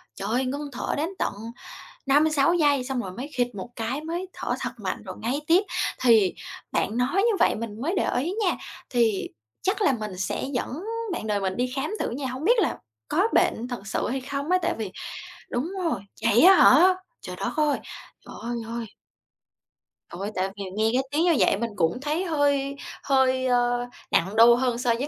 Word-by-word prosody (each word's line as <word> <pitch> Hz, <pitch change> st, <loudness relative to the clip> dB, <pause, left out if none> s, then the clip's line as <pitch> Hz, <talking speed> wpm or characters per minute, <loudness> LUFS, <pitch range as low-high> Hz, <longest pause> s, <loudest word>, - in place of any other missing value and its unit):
trời 195 Hz, -, -5 dB
ơi, 255 Hz, +3 st, +1 dB
ngưng 285 Hz, +3 st, -3 dB
thở -, -, -2 dB
đến 310 Hz, +4 st, -1 dB
tận -, -, 0 dB, 0.7 s
5-6 295 Hz, +3 st, +4 dB
giây, 290 Hz, -6 st, +3 dB
xong 260 Hz, -1 st, -2 dB
rồi 190 Hz, -5 st, -5 dB
mới 255 Hz, +8 st, -6 dB
khịt 245 Hz, -2 st, 0 dB
một 195 Hz, +3 st, -6 dB
cái 235 Hz, +5 st, -2 dB
mới 340 Hz, +4 st, -4 dB
thở -, -, -3 dB
thật -, -, -2 dB
mạnh -, -, -4 dB
rồi -, -, -7 dB
ngáy 255 Hz, +6 st, -1 dB
tiếp. 350 Hz, +5 st, +5 dB, 0.4 s
Thì 225 Hz, -7 st, +5 dB, 0.4 s
bạn 220 Hz, -, 0 dB
nói 250 Hz, +6 st, 0 dB
như 425 Hz, +2 st, +3 dB
vậy -, -, +4 dB
mình 220 Hz, -1 st, -6 dB
mới 325 Hz, +9 st, -1 dB
để -, -, +1 dB
ý 325 Hz, +9 st, -1 dB
nha, 360 Hz, -, +2 dB, 0.3 s
thì 230 Hz, -5 st, +1 dB, 0.3 s
chắc 400 Hz, +3 st, 0 dB
là 385 Hz, -, +4 dB
mình 210 Hz, -4 st, -5 dB
sẽ 195 Hz, -, -2 dB
dẫn 265 Hz, +7 st, -3 dB, 0.3 s
bạn 340 Hz, -, -4 dB
đời 205 Hz, -1 st, 0 dB
mình 190 Hz, -1 st, -2 dB
đi 250 Hz, +1 st, -1 dB
khám 275 Hz, +3 st, -1 dB
thử -, -, -1 dB
nha, 265 Hz, +3 st, -4 dB
hổng 255 Hz, +4 st, -5 dB
biết 475 Hz, +6 st, +4 dB
là 350 Hz, -, 0 dB, 0.3 s
có 380 Hz, +7 st, +2 dB
bệnh 240 Hz, +2 st, +2 dB
thật 240 Hz, -5 st, -6 dB
sự 205 Hz, -, -1 dB
hay 265 Hz, +1 st, -2 dB
không 280 Hz, +4 st, -4 dB
á? 365 Hz, -, +5 dB
Tại -, -, 0 dB
vì 205 Hz, -4 st, -4 dB, 0.6 s
đúng 275 Hz, +10 st, -2 dB
rồi, 305 Hz, -, 0 dB, 0.2 s
vậy 225 Hz, -, +5 dB
á 380 Hz, +3 st, +9 dB
hả? 360 Hz, +2 st, +7 dB, 0.3 s
Trời -, -, -7 dB
đất -, -, -2 dB
ơi, 300 Hz, -2 st, +2 dB, 0.5 s
trời -, -, -11 dB
ơi 240 Hz, +1 st, -3 dB
ơi. 235 Hz, 0 st, -4 dB, 1.2 s
Ôi, 195 Hz, +5 st, -5 dB
tại 185 Hz, +1 st, 0 dB
vì 200 Hz, -, -4 dB
nghe 220 Hz, +1 st, +2 dB
cái 260 Hz, +2 st, +2 dB
tiếng 305 Hz, +3 st, +2 dB
như 345 Hz, -2 st, +4 dB
vậy -, -, +4 dB
mình 235 Hz, +2 st, -2 dB
cũng 170 Hz, +3 st, +1 dB
thấy 305 Hz, +6 st, -1 dB
hơi 285 Hz, -4 st, +1 dB, 0.3 s
hơi, 260 Hz, -1 st, +2 dB
ơ, 245 Hz, -1 st, +1 dB, 0.2 s
nặng 190 Hz, +5 st, +1 dB
đô 235 Hz, +1 st, +8 dB
hơn 245 Hz, -1 st, 0 dB
so 245 Hz, -1 st, +2 dB
với 275 Hz, -, -2 dB
255 Hz, 205 wpm, -25 LUFS, 230-305 Hz, 1.2 s, á